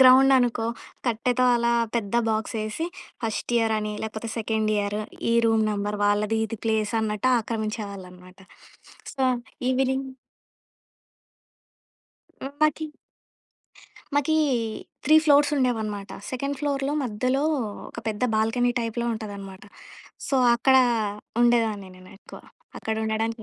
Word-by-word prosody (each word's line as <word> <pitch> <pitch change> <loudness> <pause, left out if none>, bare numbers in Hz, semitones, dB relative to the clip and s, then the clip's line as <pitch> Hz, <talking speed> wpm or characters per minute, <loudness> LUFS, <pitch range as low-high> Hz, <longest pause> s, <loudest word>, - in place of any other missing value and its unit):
గ్రౌండనుకో, 255 -3 +6 0.4
కట్టెతో 245 +2 +1
అలా 235 0 +1 0.2
పెద్ద 215 -1 -3 0.2
బాక్సేసి, 215 +6 -2 0.4
ఫస్ట్ 225 +2 -3
ఇయరని, 215 -2 0
లేకపోతే 220 +1 -5
సెకండ్ 220 -1 0
ఇయరు, 205 +1 -1 0.3
ఈ - - +3
రూమ్ 225 -1 +3
నెంబర్ 205 0 -2
వాళ్ళది 210 +2 +2
ఇది 220 0 -6
ప్లేసన్నట్టాక్రమించేవాళ్ళనమాట. 215 -4 -1 0.8
సో, 270 - -2 0.5
ఈవినింగ్ 265 +1 0 2.3
హ్మ్. 270 - -5
మాకీ... 305 +1 +2 1.3
మాకీ 290 +2 +2 0.7
3 305 - +5
ఫ్లోర్సుండేవనమాట. 250 -9 +2 0.2
సెకండ్ 275 +2 -3
ఫ్లోర్‌లో 280 -1 -1
మధ్యలో, 255 +4 0 0.5
ఒక - - -10
పెద్ద 210 0 -4
బాల్కనీ 225 +3 +2
టైప్‌‌లో 235 +1 -2
ఉంటుందన్నమాట. 200 -3 -8 0.6
సో, 275 - +2 0.2
అక్కడా 265 +2 +5 0.6
ఉండేదాన్ని 225 -5 +2
నేనెక్కువ. 185 +2 -13 0.4
అక్కడుండడానికి 220 +1 -2
225 Hz, 90 wpm, -25 LUFS, 210-255 Hz, 2.3 s, గ్రౌండనుకో